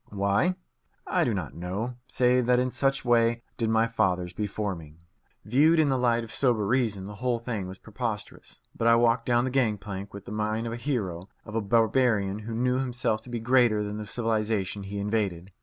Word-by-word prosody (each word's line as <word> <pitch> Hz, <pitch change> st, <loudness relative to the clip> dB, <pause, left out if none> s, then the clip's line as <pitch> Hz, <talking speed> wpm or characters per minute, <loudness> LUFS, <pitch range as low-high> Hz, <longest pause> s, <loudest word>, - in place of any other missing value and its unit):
Why? 100 Hz, -, +1 dB, 0.5 s
I -, -, +1 dB
do -, -, +1 dB
not -, -, -3 dB
know, 95 Hz, +8 st, -4 dB
save 125 Hz, -1 st, +2 dB
that 125 Hz, 0 st, +4 dB
in 125 Hz, 0 st, +1 dB
such 135 Hz, 0 st, 0 dB
way 120 Hz, -1 st, +3 dB
did 115 Hz, -2 st, -1 dB
my 110 Hz, 0 st, +3 dB
fathers 90 Hz, -6 st, 0 dB
before 105 Hz, +1 st, -2 dB
me. 80 Hz, -3 st, -11 dB, 0.5 s
Viewed 150 Hz, +9 st, +4 dB
in 155 Hz, -2 st, +4 dB
the 135 Hz, -, +2 dB
light 120 Hz, -1 st, +2 dB
of 110 Hz, -, -9 dB
sober 120 Hz, -6 st, +1 dB
reason, 110 Hz, -4 st, 0 dB
the 105 Hz, -, -7 dB
whole 125 Hz, -2 st, +1 dB
thing 115 Hz, -5 st, -4 dB
was 95 Hz, +1 st, -8 dB
preposterous. 110 Hz, 0 st, -6 dB, 0.2 s
But 115 Hz, -, 0 dB
I 115 Hz, -, +7 dB
walked 115 Hz, 0 st, +2 dB
down 120 Hz, -1 st, +3 dB
the 130 Hz, -, -1 dB
gang 120 Hz, -5 st, +2 dB
plank 100 Hz, 0 st, -7 dB
with 100 Hz, -1 st, -10 dB
the -, -, -8 dB
mien 110 Hz, +1 st, -1 dB
of 115 Hz, -, -3 dB
a -, -, -3 dB
hero, 105 Hz, -, -3 dB, 0.2 s
of 105 Hz, -, -9 dB
a 115 Hz, -, 0 dB
barbarian 110 Hz, -2 st, +2 dB
who 110 Hz, +1 st, -6 dB
knew 125 Hz, +2 st, +1 dB
himself 125 Hz, -4 st, -1 dB
to 125 Hz, -, -13 dB
be 120 Hz, -1 st, -3 dB
greater 120 Hz, -2 st, +3 dB
than 105 Hz, 0 st, -4 dB
the 105 Hz, -, -5 dB
civilization 110 Hz, -3 st, -1 dB
he 100 Hz, +1 st, -6 dB
invaded. 100 Hz, -3 st, -2 dB
115 Hz, 205 wpm, -27 LUFS, 100-125 Hz, 0.5 s, I